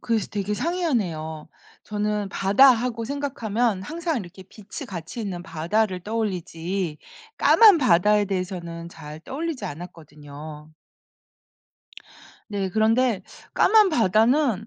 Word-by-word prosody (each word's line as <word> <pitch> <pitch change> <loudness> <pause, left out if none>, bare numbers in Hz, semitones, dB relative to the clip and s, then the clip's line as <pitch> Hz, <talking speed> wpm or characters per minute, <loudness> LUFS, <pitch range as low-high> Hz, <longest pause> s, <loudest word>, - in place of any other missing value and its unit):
그래서 230 -3 -1
되게 210 0 -2
상이하네요. 195 - -2 0.4
저는 210 -1 -2
바다하고 230 +3 +3
생각하면 240 -6 -1
항상 325 - -3
이렇게 190 -1 -10
빛이 200 +2 -10
같이 175 +5 -7
있는 185 -5 -4
바다를 185 +3 -1
떠올리지 185 -5 -3 0.4
까만 420 -7 +6
바다에 210 -4 +4
대해서는 175 -3 -4
잘 155 -2 -10
떠올리지 295 - -5
않았거든요. 150 -3 -10 1.8
네. 200 -2 -2
그런데 220 0 +2 0.3
까만 430 -2 +5
바다는 225 - +2
205 Hz, 270 characters per minute, -24 LUFS, 175-235 Hz, 1.8 s, 까만